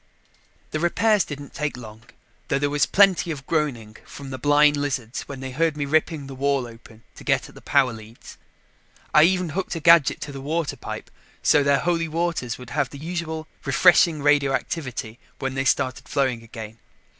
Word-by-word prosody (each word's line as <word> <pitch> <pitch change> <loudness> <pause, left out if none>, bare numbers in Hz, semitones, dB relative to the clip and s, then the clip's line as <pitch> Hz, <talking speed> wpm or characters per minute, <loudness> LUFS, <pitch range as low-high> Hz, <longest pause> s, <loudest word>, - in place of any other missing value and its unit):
The 155 - -2
repairs 205 +5 +2
didn't 145 -1 -9
take 150 -3 -3
long, 110 -2 -11 0.5
though 135 - +1
there 145 +1 0
was 145 0 +2
plenty 195 -3 +4
of 140 -4 -5
groaning 130 -10 -2
from 140 -2 -10
the 130 - -6
blind 145 +2 +4
lizards 135 -4 -3
when 135 -2 -8
they 130 0 -5
heard 155 +3 0
me 145 - -1
ripping 155 0 0
the 135 - -8
wall 135 -1 0
open 115 -1 -14
to - - -12
get - - +1
at - - -16
the - - -14
power 135 -4 +2
leads. 110 +1 -13 0.7
I 150 - +7
even 180 -1 +1
hooked 180 +3 -3
a - - -3
gadget 165 -2 +5
to 145 - -5
the 135 -1 -8
water 155 +1 -2
pipe - - -8 0.3
so 150 - +5
their 140 0 +3
Holy 170 -1 0
Waters 160 -7 -2
would 125 -2 -11
have 140 -3 0
the 140 - -10
usual 160 0 -5 0.2
refreshing 170 -4 +4
radioactivity 135 -4 0 0.2
when 135 -1 -3
they 135 0 -2
started 130 0 0
flowing 130 -5 0
again. 110 -1 -10
145 Hz, 185 wpm, -23 LUFS, 130-160 Hz, 0.7 s, I